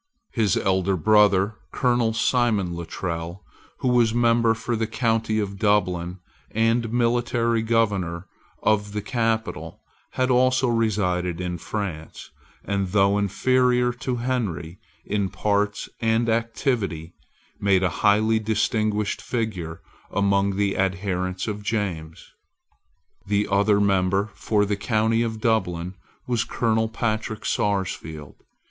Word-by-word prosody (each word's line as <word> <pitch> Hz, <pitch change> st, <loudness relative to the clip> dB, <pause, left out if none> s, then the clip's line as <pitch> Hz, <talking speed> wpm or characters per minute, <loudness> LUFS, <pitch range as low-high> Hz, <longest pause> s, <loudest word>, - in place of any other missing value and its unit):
His 110 Hz, -6 st, +2 dB
elder 95 Hz, 0 st, +1 dB
brother, 105 Hz, +1 st, +4 dB
Colonel 120 Hz, -3 st, +1 dB
Simon 115 Hz, -6 st, +1 dB
Luttrell, 85 Hz, +1 st, -5 dB, 0.4 s
who -, -, 0 dB
was 120 Hz, -2 st, +3 dB
member 115 Hz, -1 st, +3 dB
for 120 Hz, +1 st, -3 dB
the 110 Hz, 0 st, -1 dB
county 115 Hz, -1 st, 0 dB
of 100 Hz, -2 st, -4 dB
Dublin, 90 Hz, -4 st, +1 dB, 0.3 s
and 115 Hz, +1 st, +1 dB
military 120 Hz, -1 st, +1 dB
governor 100 Hz, -6 st, 0 dB, 0.4 s
of 105 Hz, -1 st, +1 dB
the 105 Hz, -, -2 dB
capital, 115 Hz, -1 st, -2 dB, 0.3 s
had 130 Hz, 0 st, +1 dB
also 130 Hz, +1 st, +3 dB
resided 90 Hz, -7 st, 0 dB
in 90 Hz, -1 st, -3 dB
France, 90 Hz, -5 st, -6 dB, 0.3 s
and, 100 Hz, -1 st, -1 dB
though 100 Hz, +1 st, +3 dB
inferior 125 Hz, +4 st, +2 dB
to 125 Hz, +1 st, -3 dB
Henry 110 Hz, -9 st, -3 dB, 0.3 s
in 100 Hz, -2 st, -1 dB
parts 105 Hz, 0 st, -1 dB
and 115 Hz, 0 st, +1 dB
activity, 115 Hz, -, -1 dB, 0.5 s
made 95 Hz, -2 st, +3 dB
a 90 Hz, -, +3 dB
highly 110 Hz, +2 st, +4 dB
distinguished 110 Hz, -1 st, 0 dB
figure 95 Hz, -9 st, -4 dB, 0.3 s
among 100 Hz, -1 st, +1 dB
the 100 Hz, 0 st, 0 dB
adherents 95 Hz, 0 st, -1 dB
of 105 Hz, -1 st, -3 dB
James. 95 Hz, -7 st, -3 dB, 1.0 s
The 105 Hz, +1 st, +1 dB
other 100 Hz, +1 st, +3 dB
member 100 Hz, +1 st, +1 dB
for 105 Hz, -2 st, +1 dB
the 100 Hz, 0 st, 0 dB
county 110 Hz, +1 st, +1 dB
of 110 Hz, -2 st, -2 dB
Dublin 90 Hz, -6 st, 0 dB, 0.3 s
was 120 Hz, -2 st, 0 dB
Colonel 110 Hz, -1 st, 0 dB
Patrick 110 Hz, -1 st, -3 dB
Sarsfield. 85 Hz, -7 st, -2 dB
105 Hz, 115 wpm, -24 LUFS, 95-115 Hz, 1.0 s, brother